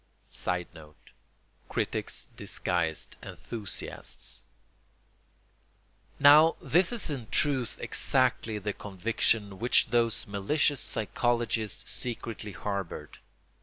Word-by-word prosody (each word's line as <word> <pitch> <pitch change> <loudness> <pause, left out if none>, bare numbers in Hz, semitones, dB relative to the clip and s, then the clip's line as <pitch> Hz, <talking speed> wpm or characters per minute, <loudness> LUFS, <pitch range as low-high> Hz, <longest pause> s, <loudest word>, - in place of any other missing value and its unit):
[Sidenote: 80 -4 -5 0.6
Critics - - -2
disguised 85 -3 -2
enthusiasts.] 110 -4 -7 1.7
Now 150 +3 +8
this 180 +4 +3
is 230 -9 0
in 125 -6 -5
truth 135 -5 +1
exactly 125 -4 +1
the 105 0 -3
conviction 105 0 0
which 120 +3 +3
those 115 -2 +2
malicious 130 +8 +1
psychologists 115 -1 0
secretly 115 -4 -4
harboured. 100 -4 -5
115 Hz, 80 wpm, -29 LUFS, 100-130 Hz, 1.7 s, Now